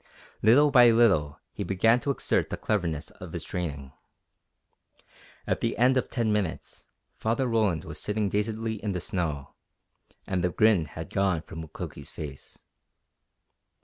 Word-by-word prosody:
Little 140 +7 +5
by 125 -3 +8
little 95 -11 +3
he - - -4
began 100 +6 +3
to 140 - -4
exert 140 - +1
the - - -4
cleverness 85 -8 -2
of - - -11
his - - -4
training. 70 -7 -5 1.5
At - - -1
the - - -1
end 125 +3 +4
of 130 - 0
ten 115 -3 0
minutes 100 -6 -3 0.3
Father 115 +4 0
Roland 105 -9 +1
was - - -8
sitting 105 0 -1
dazedly 110 +2 -2
in 105 -2 -1
the 90 - -2
snow, 80 -6 -3 0.7
and 90 -2 -1
the 90 - +2
grin 105 -3 +3
had 80 +1 -8
gone 95 -5 +1
from 80 - -8
Mukoki's 80 - -8
face. 70 -3 -9
100 Hz, 145 wpm, -27 LUFS, 80-115 Hz, 1.5 s, by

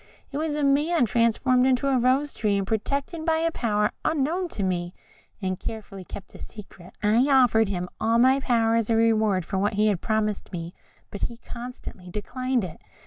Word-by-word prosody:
It 285 - -3
was 310 -1 -1
a 300 - -1
man 295 +2 +3
transformed 240 +3 +2
into 260 +1 +2
a 265 -2 +3
rose 265 +4 +2
tree, 205 -2 0
and 195 - -1
protected 280 - -2
by 320 -1 +2
a 330 +1 +1
power 210 -6 0
unknown 320 +4 0
to 210 - -5
me, 175 -1 -2 0.5
and 185 0 -2
carefully 205 -4 -7
kept 190 +1 -10
a - - -12
secret. 195 -4 -11
I 225 +6 +4
offered 240 -6 +4
him 180 -2 -2
all 230 +1 +2
my 260 +3 +5
power 230 -4 +2
as 230 -1 0
a 225 - +3
reward 220 -5 +2
for 190 - -2
what 205 +3 +1
he 210 +1 +3
had 195 -5 -1
promised 215 -2 -1
me, 170 -1 -6 0.4
but 200 - -7
he 235 - -8
constantly 235 -7 -9
declined 250 +5 -2
it. 175 -4 -8
230 Hz, 195 wpm, -25 LUFS, 205-265 Hz, 0.5 s, my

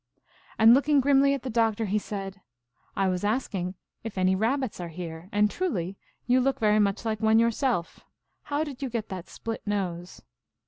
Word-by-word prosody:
And, 225 +1 +8
looking 285 +2 +4
grimly 275 +1 +4
at 275 - -7
the 260 - -4
Doc 225 -1 +2
tor, 225 - -2
1 195 - -5
he 210 - +2
said: 195 -2 -6 0.3
" 125 - -41
I 195 - +1
was 185 0 -1
asking 205 -5 -1 0.3
if 220 -3 -7
any 185 0 +3
Kabbits 235 +3 -1
are 175 - -4
here, 165 +1 -8
and 210 +1 +3
truly 200 - -2 0.3
you 250 +1 +3
look 270 +1 +1
very 215 -1 +3
much 200 +2 +1
like 220 -1 -1
one 220 0 +4
yourself. 230 - +1 0.5
How 290 +1 -1
did 285 -4 -8
you 270 - -2
get 225 -2 -4
that 185 -2 -7
split 225 0 -5
nose? 180 -4 -4
215 Hz, 195 wpm, -27 LUFS, 190-250 Hz, 0.5 s, And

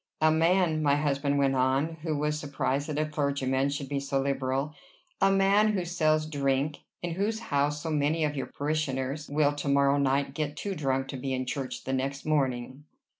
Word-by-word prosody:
"A 155 0 +4
man" 165 0 +3
my 145 -2 +3
husband 145 -1 0
went 135 -1 +3
on, 135 +5 +1
who 155 -2 -1
was 150 +1 -1
surprised 145 0 -2
that 150 - -3
a 155 - +1
clergyman 140 -3 0
should 140 -1 -4
be 140 0 -1
so 140 0 -1
liberal 135 +1 -1 0.5
"a 195 0 +5
man 200 +2 +4
who 185 -3 -1
sells 155 -3 +1
drink! 140 -1 0 0.2
in 175 - -2
whose 205 +6 -1
house 145 -8 -1
so 160 - -2
many 155 +2 +1
of 150 -1 0
your 135 - -3
parishioners 145 -1 -2
will 145 0 +2
to 145 0 -5
morrow 140 0 +3
night 135 0 +1
get 150 -1 -3
too 200 - -3
drunk 135 -5 -1
to 135 - -4
be 135 +1 -3
in 130 0 -2
church 130 0 -4
the 130 - -3
next 135 +1 -2
morning!" 130 -3 -1
145 Hz, 195 wpm, -28 LUFS, 135-155 Hz, 0.5 s, a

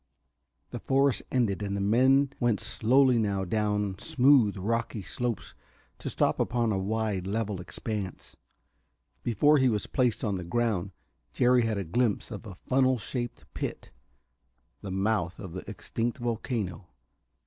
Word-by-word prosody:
The - - -5
forest 135 0 +2
ended, 110 -6 +1
and 100 -1 -2
the - - -2
men 130 +7 +4
went 120 -4 +2
slowly 120 +2 +3
now 100 -3 0
down 105 -1 -1
smooth, 125 -6 +4
rocky 110 +1 -2
slopes 120 +3 -3 0.5
to - - -4
stop - - +1
upon 120 -2 +1
a 100 - 0
wide, 105 -2 -1
level 105 -2 -2
expanse. 95 +4 -5 0.9
Before 145 +6 +4
he 130 -1 +4
was 105 -3 -1
placed 125 -4 0
on 100 -3 0
the 90 - -5
ground 100 -1 0 0.4
Jerry 125 0 +4
had 110 -2 -1
a 100 - -1
glimpse 110 +7 0
of 110 +1 -7
a 95 - -8
funnel 130 0 +3
shaped 120 +1 -5
pit - - -5 0.9
the 100 - -6
mouth 95 -1 0
of 95 -4 -8
the 95 +2 -7
extinct 115 +3 -3
volcano. 110 - -3
110 Hz, 145 wpm, -28 LUFS, 100-120 Hz, 0.9 s, men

